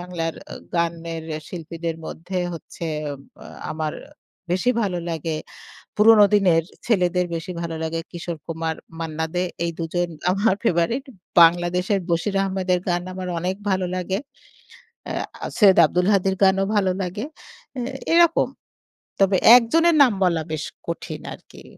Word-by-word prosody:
বাংলার 175 -2 -3
এ্যা - - -10 0.2
গানের 165 -1 -2 0.2
শিল্পীদের 165 -1 -5
মধ্যে 180 +3 -5 0.2
হচ্ছে 165 +1 -9 0.2
এ্যা 145 -1 -3 0.6
আমার 155 -1 -3 0.6
বেশি 190 +7 +2
ভালো 185 -4 -1
লাগে, 160 -1 -3 0.6
পুরনো 210 0 +7
দিনের 180 -5 +4 0.2
ছেলেদের 180 -5 +2
বেশি 165 +2 -5
ভালো 165 -1 -4
লাগে 165 +1 -2
কিশোর 170 -1 -5
কুমার, 165 0 -2 0.2
মান্না 160 -1 -2
দে 180 - +1 0.2
এই 170 - -1
দুজন 175 +2 -1 0.2
আমার 195 +1 +2
ফেবারেট। 230 +7 +1 0.4
বাংলাদেশের 175 +3 +3
বশির 170 +4 0
আহমেদের 190 -2 0
গান 175 0 +1
আমার 185 0 -5
অনেক 180 +3 -2 0.2
ভালো 185 -1 +1
লাগে। 185 +1 -2 0.9
এ্যা - - -5
সৈয়দ 200 -4 +6
আব্দুল 180 +4 0
হাদির 195 -1 +2
গানও 195 0 +4
ভালো 190 -2 +2
লাগে। 190 +5 -3 0.5
এ্যা 245 0 -3 0.2
এরকম। 340 -1 +5 0.7
তবে 195 -1 +4 0.2
একজনের 325 +8 +3
নাম 255 - +4
বলা 170 -3 +2
বেশ 155 -1 -2 0.2
কঠিন 170 - -5
আরকি। - - -16
180 Hz, 135 wpm, -23 LUFS, 165-195 Hz, 0.9 s, পুরনো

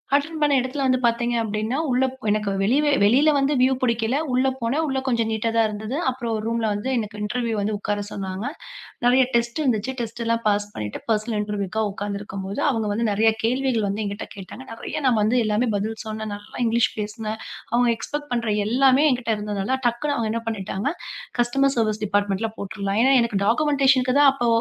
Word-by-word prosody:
Attend 310 +3 -1
பண்ண 295 -1 +3
இடத்துல 260 +3 -3
வந்து 255 - +3
பார்த்தீங்க 235 +1 +1
அப்படின்னா, 215 +4 -2
உள்ள 255 +1 +3 0.2
எனக்கு 210 -1 +1
வெளிய 275 +9 +3
வெளியில 260 +9 +5
வந்து 275 +1 +2
வியூ 260 +1 +4
பிடிக்கல. 235 0 +1 0.2
உள்ள 255 +1 +3
போனேன். 255 +7 0
உள்ள 270 - -1
கொஞ்சம் 230 -3 +1
நீட்டா 220 +1 0
தான் 225 - +4
இருந்தது. 215 +4 -5
அப்புறம் 240 -3 -3
ரூம்ல 230 0 0
வந்து 205 +6 -3
எனக்கு 210 -2 -4
இன்டெர்வியூ 230 +1 -1
வந்து 215 +2 -1
உட்கார 205 0 -2
சொன்னாங்க. 190 +1 -5 0.6
நிறைய 255 +2 +5
டெஸ்ட் 235 +4 0
வந்துச்சு. 245 -2 0
டெஸ்ட் 230 +1 -5
எல்லாம் 230 0 +1
பாஸ் 205 0 +1
பண்ணிட்டு 105 -1 -5
பர்சனல் 215 0 0
இன்டெர்வியூக்கு 210 0 -2
உட்கார்ந்து 200 0 -4
இருக்கும்போது 195 0 -5
அவங்க 225 -5 0
வந்து 230 +3 0
நிறைய 220 +2 +4
கேள்விகள் 250 -2 +1
வந்து 200 +2 -2
என்கிட்ட 205 +1 -5
கேட்டாங்க. 200 +5 -9
நிறைய 230 +6 -5
நான் 245 -3 +4
வந்து 215 +4 +2
எல்லாமே 215 +3 +1
பதில் 215 +2 -2
சொன்னேன். 215 -1 -5
நல்லா 205 0 -13
இங்கிலிஷ் 235 +1 +2
பேசுனேன். 215 +1 -4 0.3
அவங்க 240 0 +4
எக்ஸ்பெக்ட் 295 +5 -5
பண்ற 235 -1 -1 0.2
எல்லாமே 265 +5 +4
என்கிட்ட 245 -2 -1
இருந்ததுனால 210 +4 -2
டக்குன்னு 285 +5 -1
அவங்க 225 -2 -1
என்ன 230 - -2
பண்ணிட்டாங்க, 200 0 -3 0.5
கஸ்டமர் 270 +3 +2
சர்வீஸ் 215 -2 0
டிப்பார்ட்மென்ட்ல 205 +1 0
போட்டுருலாம். 200 +1 -2
ஏன்னா 270 +1 +5
எனக்கு 230 -4 0
டாக்குமென்டேஷன் 270 +1 +3
தான் 290 -1 +8
அப்போ 245 -3 -1
230 Hz, 180 wpm, -23 LUFS, 210-255 Hz, 0.6 s, தான்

